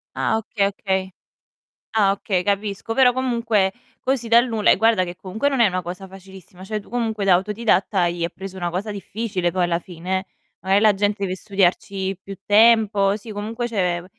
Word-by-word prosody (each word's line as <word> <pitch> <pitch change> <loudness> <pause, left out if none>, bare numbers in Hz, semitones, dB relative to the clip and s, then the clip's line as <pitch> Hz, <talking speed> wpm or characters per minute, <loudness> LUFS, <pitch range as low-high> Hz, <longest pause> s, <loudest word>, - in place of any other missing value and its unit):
Ah, 220 - +1
okay, 205 -2 -1
okay. 190 -1 -2 0.8
Ah, 200 -3 +4
okay, 195 -2 -1
capisco. 205 +2 -2
Però 255 -2 +5
comunque, 235 -6 +1 0.3
così 255 -3 -1
dal 235 +2 +5
nulla 220 -2 +2
e - - +5
guarda 225 -2 +3
che 175 0 -8
comunque 215 +10 -2
non 270 -3 -1
è 230 - +7
una 185 -1 -1
cosa 180 +3 -7
facilissima. 190 -1 -14
Cioè 215 +1 -3
tu - - -19
comunque 225 -4 -2
da 190 - +4
autodidatta 205 0 +1
hai 170 -1 0
preso 190 0 -8
una 175 -1 -2
cosa 195 +5 -3
difficile 200 -3 -3
poi 180 0 0
alla 170 -1 0
fine, 180 +2 -4
eh. 190 - -14 0.3
Magari 190 +3 +2
la 210 -2 +5
gente 205 +1 -1
deve 185 -1 -2
studiarci 195 0 -1
più 195 -1 -9
tempo. 210 -2 +4
Sì, 215 +1 -9
comunque 225 +4 -4
cioè 180 -6 -1
200 Hz, 185 wpm, -22 LUFS, 185-220 Hz, 0.8 s, è